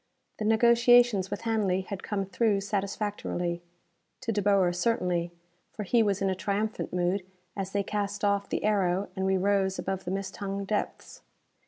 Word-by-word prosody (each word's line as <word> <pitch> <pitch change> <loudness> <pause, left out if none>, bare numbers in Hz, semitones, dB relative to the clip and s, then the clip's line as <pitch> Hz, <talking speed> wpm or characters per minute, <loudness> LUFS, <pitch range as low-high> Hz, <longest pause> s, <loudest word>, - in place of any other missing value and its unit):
The 215 - -2
negotiations 235 -2 +5
with 205 - -4
Hanley 215 -5 +1
had 190 +1 -6
come 195 -2 -2
through 200 +1 +1
satisfactorily; 195 -3 -2 0.6
to 230 - -2
De 210 -1 0
Boer, 195 -3 +3
certainly, 180 -4 0 0.4
for 215 - -5
he 230 +4 +3
was 200 -2 +1
in 195 - +2
a - - +1
triumphant 200 +4 -2
mood 180 +2 0 0.3
as 195 -1 -4
they 200 0 0
cast 205 0 -2
off 200 0 +1
the - - -2
aero 195 -2 +1
and 190 0 -1
we 190 0 +2
rose 195 0 +1
over 195 0 -2
the 185 -1 -8
mist 195 0 -4
hung 200 -1 -3
depths. 210 +1 -3
200 Hz, 170 wpm, -28 LUFS, 190-210 Hz, 0.6 s, negotiations